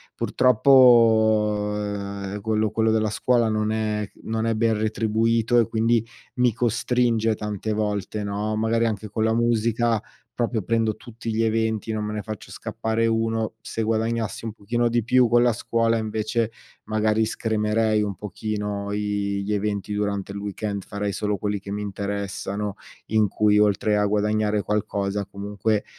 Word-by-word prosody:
Purtroppo, 110 -5 +4
ehm, 100 -1 -4
quello 110 0 0
quello 110 +1 +1
della 110 -1 +1
scuola 120 -1 +2
non 110 0 0
è 105 -2 -1
non 110 0 -1
è 115 - +1
ben 110 -1 +1
retribuito 115 +2 +2
e 115 - +2
quindi, 115 0 +2 0.3
mi 125 -2 +3
costringe 115 -1 +1
tante 105 0 -4
volte, 105 0 -2
no, 105 +1 -2
magari 115 +1 +1
anche 105 -1 -4
con 110 +2 -1
la 110 - +2
musica 115 -1 +1 0.3
proprio, 115 -3 -1
prendo 115 +1 +1
tutti 115 -1 -7
gli 110 +1 +1
eventi, 110 0 0
non 110 -1 -2
me 105 - -4
ne 105 - -3
faccio 110 -3 -7
scappare 110 +1 -2
1. 115 -1 0
Se 115 - -3
guadagnassi 115 -1 -1
un 110 - -4
pochino 120 +3 -1
di 120 0 +1
più 125 +2 +4
con 120 +1 +5
la 120 -1 +3
scuola, 115 0 +1
invece 110 +1 -1 0.3
magari 110 0 +1
scremerei 110 0 0
un 100 -2 -2
pochino 105 +1 -4
i 100 -1 -1
gli 105 +2 -2
eventi 105 0 -2
durante 100 -1 -2
il 100 - -5
weekend, 100 0 -4
farei 100 0 -3
solo 105 0 -1
quelli 105 +1 -2
che 100 - -11
mi 105 +1 -3
interessano, 100 0 -4 0.3
in 110 -1 +3
cui 105 +1 +3
oltre 105 0 +2
a 105 - +2
guadagnare 105 0 +1
qualcosa 100 -1 -1
comunque, 100 +1 -2
110 Hz, 155 wpm, -24 LUFS, 105-115 Hz, 0.3 s, con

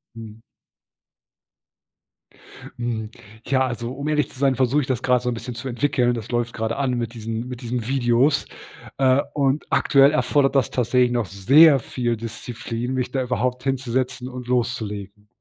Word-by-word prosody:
Mhm. 110 -1 -10 2.4
Mhm, 115 -3 -3 0.4
ja, 130 -1 +2
also, 120 -1 -4
um 140 +2 -5
ehrlich 150 -2 +1
zu - - -14
sein, 135 -1 +3
versuche 135 +3 +2
ich 135 - -5
das 130 -3 -1
grad 125 -1 +3
so 125 - -2
'n 120 - -1
bisschen 120 +1 -6
zu 120 +3 -6
entwickeln. 125 -1 +1
Das 115 -1 -6
läuft 120 0 -1
grade 110 0 -2
an 135 -2 0
mit 115 -1 -3
diesen 115 +1 -5
mit 125 0 -7
diesen 120 -1 -3
Videos, 135 +2 +2 0.5
äh, 135 +1 +4
und 140 0 +1
aktuell 140 0 +4
erfordert 145 -2 +2
das 135 -4 +2
tatsächlich 125 0 +2
noch 120 -2 0
sehr 135 - +6
viel 120 -1 -2
Disziplin, 115 +2 -5
mich 125 -1 -2
da 135 - -1
überhaupt 125 +1 -2
hinzusetzen 130 -1 -2
und 125 -1 -8
loszulegen. 105 -5 -3
125 Hz, 165 wpm, -22 LUFS, 115-135 Hz, 2.4 s, sehr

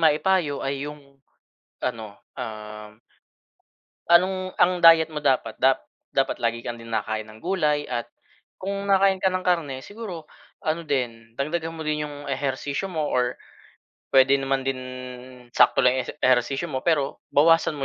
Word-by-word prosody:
maipayo 155 -1 +2
ay 140 +1 -2
yung 140 -2 -13 0.6
ano, 110 -5 -4 0.2
uhm 105 -2 -8 1.1
anong 185 +2 +3
ang 180 0 +3
diet 165 -1 +7
mo 155 - -4
dapat 130 -6 0
dap 135 0 +3 0.3
dapat 135 -1 +1
lagi 115 0 -1
kang 120 0 -5
din 115 0 -11
nakakain 110 0 -2
ng 110 0 -14
gulay 150 -5 +1
at 120 -2 -2 0.5
kung 200 +1 -3
nakakain 195 -1 +4
ka 190 - +4
ng 185 0 -2
karne, 165 -7 +1
siguro 200 -6 -8 0.4
ano 160 +2 -1
din, 115 -5 -3
dagdagan 160 +5 -2
mo 160 - -6
din 150 -1 -1
'yong 145 -1 -8
ehersisyo 140 +5 -2
mo 155 -4 -1
or 125 0 +1 0.8
puwede 135 +1 +6
naman 135 0 0
din 135 -1 -2 0.7
sakto - - +4
lang 125 +1 +4
'yong - - -1
ese - - -4
ehersisyo 130 +5 +2
mo, 130 - -1
pero 145 -5 +1
bawasan 165 +1 +4
mo 140 - -3
145 Hz, 155 wpm, -24 LUFS, 125-165 Hz, 1.1 s, diet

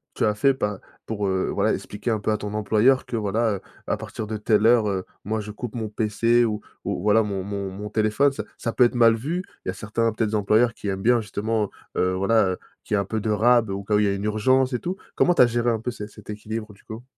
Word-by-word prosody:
tu - - +1
as 105 - +2
fait 135 +5 +2
par 105 -5 -2 0.3
pour, 105 -3 -2
heu, 95 0 0
voilà - - +2
expliquer 105 +4 -4
un 110 - +1
peu 110 - -1
à 105 - +1
ton 105 - -5
employeur 110 +5 +3
que, 120 - -5
voilà, 110 +1 0
heu, - - -13 0.2
à - - 0
partir 110 - -6
de 110 0 -4
telle 105 +1 +2
heure, 115 -3 +5
heu, 95 -2 -2 0.2
moi 110 +2 -2
je 105 0 -6
coupe 115 +2 -7
mon 110 -2 -3
PC 115 +3 +2
ou 105 -2 -1 0.2
ou - - -2
voilà, 105 +1 +4
mon 100 -3 -3
mon 100 -1 -4
mon 105 +2 -7
téléphone? 110 +6 +2
Ça - - -5
ça 115 - -3
peut 125 - +5
être 120 - 0
mal 115 -1 +6
vu, 160 +11 -3 0.2
il - - -2
y - - +1
a - - -8
certains, 115 +2 -1
peut-être, 110 -1 -1
employeurs 110 +3 +3
qui 105 - -7
aiment 95 0 -2
bien 120 0 +4
justement, 105 0 -2 0.3
heu 90 0 +1
voilà, 100 +2 +3
heu, - - -6 0.3
qu'il 105 - -1
y - - +3
ait - - +2
un 100 - -4
peu 110 +3 -2
de 110 - -2
rab 115 +1 +4
au 100 +1 -4
cas 105 +2 -2
où 105 - +5
il 105 - +3
y - - +2
a - - +1
une 100 - -5
urgence 130 +5 +2
et 125 - 0
tout. 180 +2 -3 0.2
Comment 175 0 +3
tu - - +7
as - - +5
géré 120 0 0
un 115 -2 0
peu 120 +2 -3
cet 105 -2 -8
cet 105 - -10
équilibre 110 0 -6
du 100 - -22
coup? 110 +2 -9
110 Hz, 285 wpm, -24 LUFS, 105-115 Hz, 0.3 s, tu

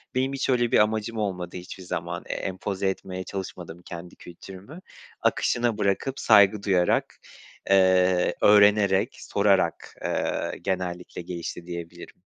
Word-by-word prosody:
Benim 130 +1 0
hiç 135 - -2
öyle 120 -2 +2
bir - - +5
amacım 110 +1 0
olmadı 90 -4 -3
hiçbir 90 +1 -9
zaman. - - -4
Eee, - - -2
empoze 95 +1 -2
etmeye 95 -1 -5
çalışmadım 90 -3 -7
kendi 85 0 -9
kültürümü. 95 - -12 0.4
Akışına 120 -2 +1
bırakıp, 105 +7 -1
saygı 100 -1 +5
duyarak, 90 -3 +1 0.5
eee, 95 -2 +4
öğrenerek, 105 -1 +4
sorarak, 100 -4 0
eee, - - -2
genellikle 90 -2 -3
gelişti 85 0 -6
diyebilirim. 85 -1 -9
95 Hz, 120 wpm, -25 LUFS, 90-105 Hz, 0.5 s, bir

